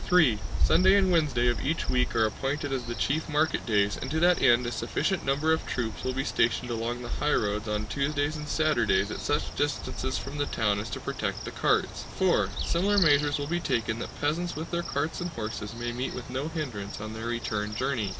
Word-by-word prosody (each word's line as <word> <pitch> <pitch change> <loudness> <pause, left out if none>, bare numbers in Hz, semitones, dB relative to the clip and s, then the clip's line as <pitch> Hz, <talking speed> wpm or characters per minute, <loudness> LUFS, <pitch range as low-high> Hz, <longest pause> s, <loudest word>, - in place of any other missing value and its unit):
(3) 155 - +5 0.2
Sunday 185 - +5
and 190 -2 +4
Wednesday 150 -8 +2
of 120 - +1
each 160 +3 -1
week 125 0 +1
are 115 -1 +4
appointed 135 +5 -2
as 125 -3 -2
the 120 - -4
chief 155 +6 -1
market 155 +1 +1
days 105 -2 +2
and 130 - -4
to 160 +3 0
that 175 +1 +4
end 120 +1 +5
a 120 - -2
sufficient 190 +8 -1
number 145 +4 +2
of 160 - -1
troops 115 -3 -3
will 130 - 0
be 135 +1 -2
stationed 120 +1 +1
along 120 +2 -3
the - - -5
highroads 105 -7 +1
on 105 0 -1
Tuesdays 145 +6 -1
and 150 -1 -6
Saturdays 145 -10 +2
at - - -4
such - - -1
distances 135 -2 -1
from 140 +2 -6
the 145 - 0
town 105 -2 +1
as 105 - -5
to - - -4
protect - - -3
the - - -5
carts. - - 0
(4) 175 - +2 0.2
Similar 200 +4 +2
measures 145 -5 +4
will 145 - -3
be 175 +4 -1
taken 115 -7 -1
that - - -7
peasants 170 +4 -1
with 160 +2 -6
their 170 0 0
carts 155 +1 -2
and 175 - -2
horses 110 -4 -5
may 120 0 -3
meet 125 +2 -3
with 125 0 -7
no 135 +4 -2
hindrance 125 -13 -5
on 110 +1 -6
their 110 +1 -5
return 105 -3 -2
journey. 125 -4 -1
135 Hz, 220 wpm, -28 LUFS, 115-155 Hz, 0.2 s, 3